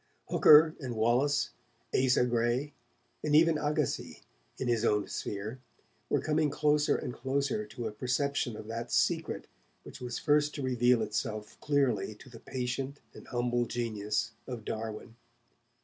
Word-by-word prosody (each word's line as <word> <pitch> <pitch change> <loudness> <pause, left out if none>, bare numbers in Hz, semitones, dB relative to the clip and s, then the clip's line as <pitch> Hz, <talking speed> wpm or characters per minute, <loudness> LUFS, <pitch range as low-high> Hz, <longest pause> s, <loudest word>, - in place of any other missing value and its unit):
Hooker 155 +1 +7
and 130 -5 -5
Wallace, 125 +6 +2 0.4
Asa 125 -1 +3
Gray 120 +4 0 0.5
and 150 -1 +2
even 160 0 +5
Agassiz, 150 0 0 0.2
each - - -22 0.4
in 130 - -3
his 120 -2 +1
own 105 -3 +2
sphere, 105 +5 -5 0.5
were - - +2
coming 155 -1 +1
closer 150 +1 +2
and - - -4
closer 140 - -1
to 120 - -6
a 110 - -2
perception 125 +1 -1
of - - -8
that 115 +1 -5
secret - - +1 0.4
which - - -11
was 120 -1 -4
first 150 0 +2
to 145 - -4
reveal 125 -2 +3
itself 110 -1 -3
clearly 140 -7 +1
to 130 - -15
the 115 - -11
patient 130 +3 -4
and - - -13
humble 120 -1 0
genius 105 -3 -2 0.2
of 120 -4 -6
Darwin. 110 +1 -5
125 Hz, 150 wpm, -31 LUFS, 115-145 Hz, 0.5 s, Hooker